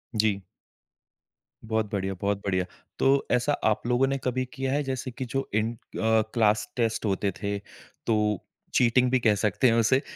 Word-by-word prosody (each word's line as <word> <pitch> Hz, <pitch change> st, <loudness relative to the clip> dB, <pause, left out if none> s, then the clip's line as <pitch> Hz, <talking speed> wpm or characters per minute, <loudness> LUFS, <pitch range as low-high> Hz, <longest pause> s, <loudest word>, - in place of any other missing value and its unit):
जी। 105 Hz, -2 st, +2 dB, 1.2 s
बहुत 110 Hz, -1 st, -1 dB
बढ़िया, 95 Hz, -1 st, -1 dB
बहुत 100 Hz, 0 st, +1 dB
बढ़िया। 95 Hz, -2 st, +1 dB, 0.3 s
तो 135 Hz, +1 st, +3 dB
ऐसा 125 Hz, +4 st, +2 dB
आप 110 Hz, +2 st, +1 dB
लोगों 125 Hz, +2 st, +3 dB
ने 135 Hz, +1 st, 0 dB
कभी 130 Hz, 0 st, 0 dB
किया 135 Hz, -2 st, -2 dB
है? 145 Hz, +1 st, +1 dB
जैसे 130 Hz, -1 st, -3 dB
कि 125 Hz, +2 st, -5 dB
जो 135 Hz, +2 st, -2 dB
इन 110 Hz, +2 st, +1 dB
अ, -, -, -15 dB, 0.6 s
क्लास 105 Hz, -2 st, +3 dB
टेस्ट 115 Hz, -2 st, 0 dB
होते 100 Hz, 0 st, 0 dB
थे, 100 Hz, -1 st, -1 dB, 0.5 s
तो 105 Hz, -3 st, +1 dB, 0.3 s
चीटिंग 125 Hz, +1 st, +4 dB
भी 130 Hz, -, +4 dB
कह 110 Hz, -3 st, +3 dB
सकते 105 Hz, +5 st, +2 dB
हैं 115 Hz, -, +4 dB
उसे 130 Hz, +4 st, +3 dB
115 Hz, 170 wpm, -27 LUFS, 105-130 Hz, 1.2 s, चीटिंग